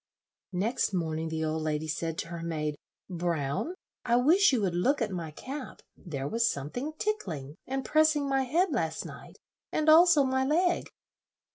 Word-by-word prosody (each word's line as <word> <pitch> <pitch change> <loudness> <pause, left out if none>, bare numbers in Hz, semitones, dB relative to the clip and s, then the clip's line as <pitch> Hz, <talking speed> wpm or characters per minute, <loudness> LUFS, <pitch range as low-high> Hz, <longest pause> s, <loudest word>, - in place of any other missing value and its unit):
Next 205 +3 0
morning 160 -2 -1
the 160 0 -2
old 155 0 -1
lady 155 0 -2
said 165 +1 -3
to 165 - -4
her 170 -1 -6
maid, 155 -2 -2 0.3
"Brown, 170 - -2 0.3
I 235 -1 +2
wish 320 +11 +5
you 255 - +2
would 190 -3 0
look 250 +12 +2
at 225 -4 -1
my 170 -4 -4
cap; 260 - -8
there 140 -6 -5
was 230 +6 +2
something 245 - -4
tickling 165 - -3
and 270 0 -3
pressing 310 -2 +3
my 270 -1 +1
head 335 +7 +2
last 165 - -1
night, - - -11 0.3
and 310 0 +1
also 325 -2 +7
my 265 0 +1
leg." 345 +6 +1
210 Hz, 165 wpm, -29 LUFS, -, 0.3 s, also